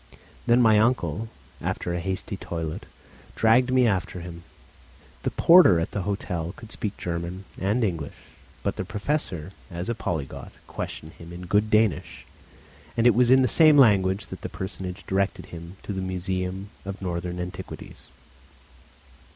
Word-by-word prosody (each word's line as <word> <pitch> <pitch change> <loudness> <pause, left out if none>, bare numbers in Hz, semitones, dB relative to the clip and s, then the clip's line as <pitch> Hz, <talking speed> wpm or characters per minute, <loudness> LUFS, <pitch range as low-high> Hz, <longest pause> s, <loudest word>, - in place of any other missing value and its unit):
Then 120 +1 +5
my 110 -2 +6
uncle, 110 - +1 0.3
after 85 - -2
a 85 - -1
hasty 95 +3 -2
toilet, 80 -4 -5 0.5
dragged 120 +3 +4
me 130 -1 +5
after 95 -4 0
him. 85 -1 -8 0.8
The - - 0
porter 165 - +7
at 80 - -2
the 100 - -2
hotel 90 -3 -3
could 115 -1 -12
speak 105 -1 -4
German 85 +2 -4
and 105 +6 +1
English; 85 -8 -2 0.5
but - - -1
the - - -1
Professor, 105 - -2 0.2
as 90 +2 -5
a - - +1
polyglot, 80 - -4
questioned 80 - -6
him 85 0 -10
in 90 +1 -8
good 105 +4 +2
Danish, 110 -4 +1 0.7
and 115 - +2
it 120 - +7
was 125 0 +4
in 130 +1 +7
the - - +4
same 155 +4 +6
language 100 -6 +5
that - - -8
that - - -5
personage 95 0 -6
directed 95 0 0
him 85 +2 -9
to 105 - -4
the 95 - -3
Museum 95 +1 -3
of 100 +1 -6
Northern 90 -1 -3
Antiquities. 90 +1 -7
95 Hz, 155 wpm, -25 LUFS, 90-110 Hz, 0.8 s, porter